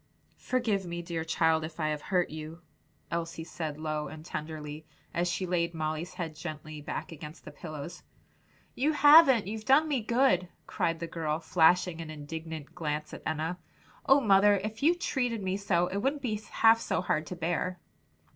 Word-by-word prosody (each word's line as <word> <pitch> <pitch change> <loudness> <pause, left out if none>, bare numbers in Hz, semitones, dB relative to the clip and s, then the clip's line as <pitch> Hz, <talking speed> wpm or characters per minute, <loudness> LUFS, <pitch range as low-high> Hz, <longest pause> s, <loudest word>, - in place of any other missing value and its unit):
"Forgive 230 -6 0
me, 170 0 -4
dear 170 -2 -3
child, 160 0 +2
if 160 +1 -7
I 155 -1 +1
have 150 -1 -2
hurt 180 -2 0
you," 155 +2 -8 0.5
Elsie 165 -1 -3
said 155 -2 -5
low 155 -1 -3
and 155 +2 -10
tenderly, 155 -2 -6 0.3
as 175 +1 0
she 185 +1 -1
laid 170 -1 0
Molly's 155 +2 -3
head 165 -3 -4
gently 155 0 -7
back 145 - -5
against 155 0 -10
the 150 - -8
pillows. 155 +2 -8 0.7
"You 300 +4 +1
haven't! 290 - +7
you've 215 +2 -5
done 275 +4 +5
me 280 -5 0
good!" 230 -5 +2 0.2
cried 165 -1 -1
the - - -1
girl, 160 -2 -2
flashing 170 0 +3
an 160 - -7
indignant 155 0 -7
glance 150 -2 -3
at - - -7
Enna. 160 +3 -2 0.5
"Oh, 270 +1 +7
mother, 205 -3 +5
if 220 +1 -5
you 330 +5 +5
treated 245 - -1
me 190 0 0
so, 190 -3 +1
it 185 - -3
wouldn't 275 +7 -1
be 215 -4 -1
half 225 0 +5
so - - -1
hard 155 -3 0
to 180 - -5
bear!" 175 +2 -2
170 Hz, 175 wpm, -30 LUFS, 155-205 Hz, 0.7 s, haven't